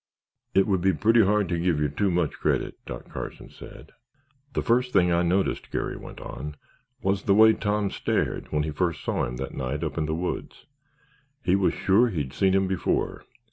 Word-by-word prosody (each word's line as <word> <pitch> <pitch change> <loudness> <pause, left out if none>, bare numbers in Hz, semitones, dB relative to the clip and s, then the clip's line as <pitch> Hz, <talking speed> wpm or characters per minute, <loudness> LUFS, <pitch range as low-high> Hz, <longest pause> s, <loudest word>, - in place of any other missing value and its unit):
"It 95 - +5
would 95 -4 +1
be 95 +1 +3
pretty 115 +1 +4
hard 105 0 +2
to 85 -1 0
give 85 -3 +1
you 75 - +2
too 85 +8 0
much 85 -4 0
credit," - - 0
Doc - - -7
Carson - - -7
said. - - -12 0.6
"The - - -1
first 125 +2 +2
thing 90 -3 +4
I 85 0 +3
noticed," 90 +3 0
Garry - - -2
went - - -10
on, 75 +4 -7 0.5
"was 95 0 +1
the 100 - +4
way 110 +1 +7
Tom 105 -2 -1
stared - - -1
when 75 -1 +1
he 75 - -3
first 85 -1 -1
saw - - 0
him 60 - -5
that 65 +2 -5
night 70 +4 -3
up 80 +1 -3
in 75 - -1
the 80 - -1
woods. 90 +2 -4 0.8
He 90 - +3
was 95 -2 +2
sure 110 +6 +3
he'd 75 - -3
seen 95 -1 +2
him 95 0 +2
before. 95 -1 -1
90 Hz, 200 wpm, -26 LUFS, 75-100 Hz, 0.8 s, way